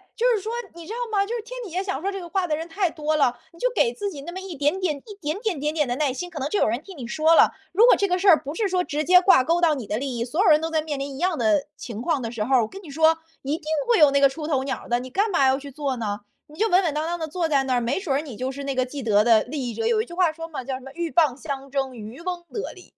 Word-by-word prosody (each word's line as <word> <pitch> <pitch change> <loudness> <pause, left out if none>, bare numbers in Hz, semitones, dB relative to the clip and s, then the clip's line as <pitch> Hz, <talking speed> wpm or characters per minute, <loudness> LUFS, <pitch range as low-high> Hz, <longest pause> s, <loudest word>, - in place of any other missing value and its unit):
就 475 - -1
是 450 -5 +2
说， 440 - -4 0.2
你 335 -1 -11
知 - - -7
道 - - -5 0.2
吗？ 395 - +4
就 460 +4 -3
是 470 - -3
天 - - -8
底 425 - -7
下 370 +3 -1
想 380 -8 -3
说 395 +3 -1
这 390 - -5
个 350 - -8
话 370 +1 -1
的 305 -2 0
人 325 +1 -5
太 365 +2 0
多 310 -1 -1
了， 250 -5 +2
你 335 - -17
就 - - +2
给 475 -1 +2
自 405 -1 -3
己 290 -8 -8
那 340 +5 -7
么 375 - -6
一 380 -3 -7
点 295 +6 +1
点， 340 -6 -1
一 415 +10 -12
点 305 +4 -2
点 425 - -2
点 295 +2 0
点 300 -4 +1
的 245 - -1
耐 290 -2 +1
心， 355 +8 -5
可 305 - -6
能 275 +2 -2
就 410 - 0
有 - - +3
人 235 +5 -1
替 385 0 -11
你 260 -6 -7
说 315 +6 +3
了。 - - +6 0.2
如 425 +6 +5
果 - - +7
这 400 - +1
个 360 -1 +1
事 395 - 0
儿 335 -5 +9
不 290 +3 -6
是 435 +1 0
说 365 -1 +1
直 305 -2 -2
接 360 0 +7
挂 355 -9 +6
钩 335 +4 +1
到 325 -3 +4
你 255 -5 -6
的 210 - -1
利 265 -2 -3
益， 235 - -1
所 315 - 0
有 380 - +5
人 305 -1 +6
都 325 +1 -3
在 315 -1 +1
面 305 -2 -4
临 275 0 -4
一 - - -8
样 360 -1 +1
的 310 -4 +2
情 230 -3 -7
况 295 0 0
的 230 -1 -4
时 220 -3 -3
候 265 +4 +2
儿， 250 - +5
我 - - -2
跟 390 - -10
你 325 - -11
说， 320 +3 +3 0.2
一 280 +3 -1
定 320 - -17 0.2
会 470 -5 +4
有 300 -2 +8
那 280 - +3
个 280 - +7
出 300 +3 -6
头 275 -4 +1
鸟 275 - -3
儿 - - -13
的， 240 0 +2
你 255 +1 -7
干 405 - +1
嘛 275 -6 +3
要 265 0 +3
去 285 0 -10
做 275 -1 -2
呢？ 210 -3 -3 0.3
你 305 +2 -15
就 445 - +3
稳 375 -2 +4
稳 320 -4 0
当 305 +1 -2
当 345 +1 -2
地 325 - -3
坐 335 +1 -1
在 280 -3 +2
那 260 -1 0
儿， - - +3
没 255 +10 -1
准 325 -8 -1
儿 270 - +2
你 290 -6 -7
就 255 +4 -3
是 280 +1 -7
那 275 -1 -2
个 255 0 +1
既 275 +2 -7
得 210 -3 +3
的 225 -1 +5
利 265 -1 -4
益 - - -5
者， 455 - -2
有 450 -2 +3
一 - - -5
句 345 - -12
话 350 -3 +2
说 330 +1 -7
嘛， 305 - -5
叫 270 - -3
什 260 - -8
么：” 270 - -10
鹬 340 +3 -3
蚌 300 -7 +3
相 275 -2 -5
争， 270 -2 -2
渔 220 +3 -9
翁 350 0 -4
得 425 - -4
利。“ - - -14
310 Hz, 385 characters per minute, -24 LUFS, 270-360 Hz, 0.3 s, 儿